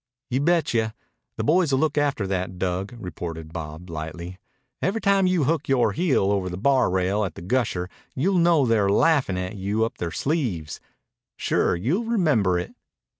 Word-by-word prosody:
"Y'betcha! 135 Hz, -6 st, +1 dB, 0.4 s
The -, -, -3 dB
boys'll 155 Hz, -3 st, +3 dB
look 150 Hz, +1 st, +1 dB
after 145 Hz, -8 st, +1 dB
that, 95 Hz, -1 st, -3 dB
Dug," 95 Hz, +5 st, -2 dB
retorted 80 Hz, -5 st, -7 dB
Bob 80 Hz, +2 st, -7 dB
lightly. 85 Hz, +3 st, -6 dB, 0.4 s
"Every 200 Hz, +4 st, 0 dB
time 195 Hz, -3 st, +3 dB
you 180 Hz, -4 st, +2 dB
hook 160 Hz, +3 st, 0 dB
yore 130 Hz, -3 st, +3 dB
heel 140 Hz, -, +1 dB
over 95 Hz, -2 st, 0 dB
the 90 Hz, -, -5 dB
bar 130 Hz, +4 st, +3 dB
rail 95 Hz, +3 st, +1 dB
at 90 Hz, -6 st, -4 dB
the -, -, -9 dB
Gusher, 100 Hz, -4 st, 0 dB, 0.3 s
you'll 180 Hz, +7 st, +2 dB
know 170 Hz, -4 st, +4 dB
they're 110 Hz, -4 st, +2 dB
laughin' 130 Hz, -, +3 dB
at 90 Hz, +3 st, -4 dB
you 105 Hz, +4 st, 0 dB
up 115 Hz, -, -7 dB
their 85 Hz, -, -2 dB
sleeves. 110 Hz, -, -2 dB, 0.6 s
Sure, -, -, +1 dB
you'll 145 Hz, -, -1 dB
remember 150 Hz, -, +2 dB
it." 90 Hz, -, -4 dB
110 Hz, 165 wpm, -24 LUFS, 90-150 Hz, 0.6 s, know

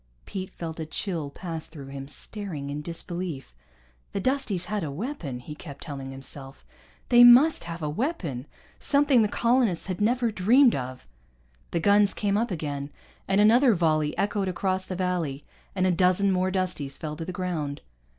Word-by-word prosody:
Pete 190 Hz, -1 st, -5 dB
felt 165 Hz, -1 st, -6 dB
a 160 Hz, -, -3 dB
chill 165 Hz, -3 st, -3 dB
pass 165 Hz, +1 st, -6 dB
through 140 Hz, -4 st, -10 dB
him, 135 Hz, 0 st, -7 dB
staring 155 Hz, -3 st, -6 dB
in 145 Hz, +1 st, -4 dB
disbelief. 170 Hz, -, -5 dB, 0.6 s
The -, -, -1 dB
Dusties 240 Hz, -6 st, 0 dB
had 205 Hz, 0 st, -2 dB
a 155 Hz, -, -3 dB
weapon, 160 Hz, -, -5 dB
he 150 Hz, -, -8 dB
kept 145 Hz, -2 st, -9 dB
telling 140 Hz, -4 st, -6 dB
himself, 135 Hz, +1 st, -7 dB, 0.4 s
they 240 Hz, -1 st, +8 dB
must 250 Hz, -, +7 dB
have 170 Hz, -1 st, -6 dB
a -, -, 0 dB
weapon, 155 Hz, -, -3 dB, 0.3 s
something 280 Hz, -3 st, +4 dB
the 215 Hz, -, +3 dB
colonists 230 Hz, -5 st, +1 dB
had 185 Hz, 0 st, -4 dB
never 235 Hz, +2 st, +2 dB
dreamed 235 Hz, +7 st, +5 dB
of. 130 Hz, -, -5 dB, 0.6 s
The 170 Hz, -, -1 dB
guns 205 Hz, +3 st, +4 dB
came 200 Hz, -1 st, 0 dB
up 230 Hz, +3 st, +1 dB
again, 145 Hz, -5 st, -4 dB, 0.4 s
and 195 Hz, +1 st, +2 dB
another 230 Hz, +3 st, +6 dB
volley 155 Hz, -3 st, +1 dB
echoed 200 Hz, -1 st, 0 dB
across 185 Hz, +1 st, -1 dB
the 185 Hz, -, -5 dB
valley, 175 Hz, -6 st, -2 dB, 0.3 s
and 185 Hz, -1 st, +1 dB
a 185 Hz, -, +4 dB
dozen 185 Hz, +3 st, +3 dB
more 185 Hz, 0 st, +1 dB
Dusties 180 Hz, -7 st, -2 dB
fell 150 Hz, -1 st, -5 dB
to 165 Hz, -, -5 dB
the 185 Hz, -, -4 dB
ground. 170 Hz, -6 st, -3 dB
180 Hz, 170 wpm, -26 LUFS, 150-205 Hz, 0.6 s, they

